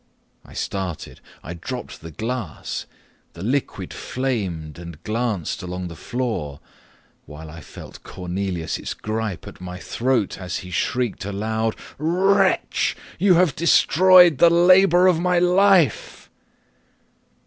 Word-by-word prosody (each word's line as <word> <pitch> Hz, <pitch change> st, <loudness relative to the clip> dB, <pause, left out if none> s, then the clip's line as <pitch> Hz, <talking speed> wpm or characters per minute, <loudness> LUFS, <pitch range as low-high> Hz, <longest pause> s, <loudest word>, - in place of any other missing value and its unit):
I -, -, -16 dB
started 95 Hz, -5 st, -5 dB, 0.2 s
I 85 Hz, -, -6 dB
dropped 120 Hz, +9 st, -7 dB
the 80 Hz, -, -9 dB
glass 110 Hz, +1 st, -5 dB, 0.5 s
the 85 Hz, -, -11 dB
fluid 130 Hz, +6 st, -2 dB
flamed 95 Hz, -, -4 dB
and 85 Hz, -3 st, -10 dB
glanced 110 Hz, -5 st, -2 dB
along 90 Hz, 0 st, -5 dB
the 85 Hz, -, -9 dB
floor, 90 Hz, -, -4 dB, 0.7 s
while 75 Hz, +1 st, -10 dB
I 85 Hz, +1 st, -10 dB
felt -, -, -12 dB
Cornelius's 90 Hz, -2 st, -4 dB
gripe 110 Hz, -3 st, -4 dB
at -, -, -12 dB
my 90 Hz, 0 st, -7 dB
throat, 115 Hz, +1 st, -1 dB
as 90 Hz, -1 st, -4 dB
he 90 Hz, -, -10 dB
shrieked 120 Hz, +4 st, -1 dB
aloud, 110 Hz, +3 st, -2 dB, 0.2 s
"Wretch! 180 Hz, +6 st, +1 dB, 0.2 s
you 190 Hz, -2 st, +5 dB
have 170 Hz, -5 st, +3 dB
destroyed 175 Hz, -1 st, +5 dB
the 170 Hz, -, +7 dB
labour 180 Hz, +1 st, +5 dB
of 180 Hz, -3 st, +4 dB
my 180 Hz, 0 st, +1 dB
life!" 180 Hz, -, +2 dB
110 Hz, 120 wpm, -22 LUFS, -, 0.7 s, the